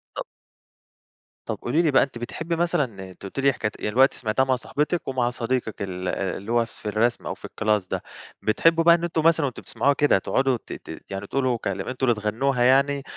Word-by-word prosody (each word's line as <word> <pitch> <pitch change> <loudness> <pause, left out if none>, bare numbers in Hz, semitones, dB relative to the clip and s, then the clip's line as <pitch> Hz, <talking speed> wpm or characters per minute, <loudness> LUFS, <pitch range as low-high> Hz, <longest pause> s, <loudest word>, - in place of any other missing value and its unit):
طب - - -4 1.2
طب - - -3
قولي 150 +8 +1
لي 160 - +2
بقى 135 - +5
أنتِ 135 -3 -6
بتحبي 160 +8 -4
مثلًا 125 - -1
أنتِ - - -18
قلتِ 100 +7 -6
لي 135 -1 +4
حكاية 105 -3 -2
يعني 105 - -2
دلوقتي 135 +2 +4
سمعتِيها 115 +3 +1
مع 130 -1 +2
صاحبتِك، 150 +6 -2
ومع 130 -2 +1
صديقِك 120 -2 -2
ال 90 -1 -4
آآ 95 0 -2
اللي 100 +4 -7
هو 120 -1 +3
في 115 - -18
الرسم 115 +3 0
أو - - -2
في - - -12
الكلاس 105 -4 0
ده. - - -3 0.4
بتحبوا 165 +9 +3
بقى 170 0 +7
إن 170 - -4
أنتم 165 -2 0
مثلًا 165 -2 +4
وأنتم 130 -3 -4
بتسمعوها 140 +1 +1
كده 145 -6 +3
تقعدوا 130 +6 +1
ت - - -6
ت - - -9
يعني 95 +1 -5
تقولوا 130 -3 0
كلم 100 -3 -4
أنتم 130 +1 -1
اللي 110 -3 +1
تغنوها 120 +4 +1
يعني، 135 +2 +3
125 Hz, 215 wpm, -24 LUFS, 110-140 Hz, 1.2 s, بقى